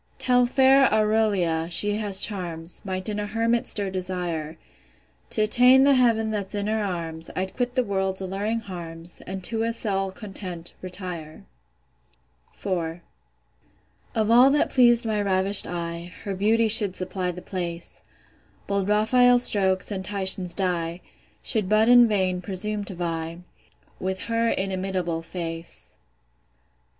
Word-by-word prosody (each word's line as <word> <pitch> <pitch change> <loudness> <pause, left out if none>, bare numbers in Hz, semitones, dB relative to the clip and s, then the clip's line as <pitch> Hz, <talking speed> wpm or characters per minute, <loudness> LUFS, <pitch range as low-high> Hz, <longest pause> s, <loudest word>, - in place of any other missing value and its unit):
Tell 250 -1 +2
fair 265 +1 +4
AURELIA, 210 -7 +1
she 205 +4 +3
has 200 -3 +2
charms, 175 -5 -4
Might 185 0 -4
in 210 -1 -3
a 205 - -3
hermit 230 +3 0
stir 200 -2 -1
desire. 175 -4 -4 0.7
T' 215 - +2
attain 250 +5 +5
the 280 0 +5
heav'n 230 -4 +2
that's 205 -1 -3
in 205 0 -2
her 215 0 -1
arms, 165 -4 -4
I'd 190 +1 -4
quit 245 0 -2
the 255 - +2
world's 190 -3 -1
alluring 200 +4 -3
harms, 170 -3 -6
And 190 0 -6
to 225 +4 -1
a 230 +1 0
cell 195 -4 -1
content, 185 -4 -8
retire. 180 -4 -8 1.1
IV. 170 -3 -3 1.1
Of 220 0 +1
all 245 +3 +7
that 290 +1 +1
pleas'd 240 -2 +4
my 215 -2 0
ravish'd 195 0 +2
eye, 170 0 -5
Her 200 - -4
beauty 220 +4 +2
should 205 -3 +5
supply 185 0 -3
the 180 0 -7
place; 175 -2 -6 0.6
Bold 200 -1 -1
Raphael's 245 +4 +4
strokes, 190 -3 +2
and 190 -2 -4
Titian's 190 -2 +1
dye, 175 -2 -2 0.4
Should 210 -5 +1
but 215 +1 +3
in 245 -1 +7
vain 185 -4 0
presume 205 +3 -2
to 190 - -8
vie 165 -1 -4 0.6
With 190 0 -3
her 230 0 0
inimitable 185 -4 -2
face. 165 -1 -6
195 Hz, 140 wpm, -24 LUFS, 180-220 Hz, 1.1 s, all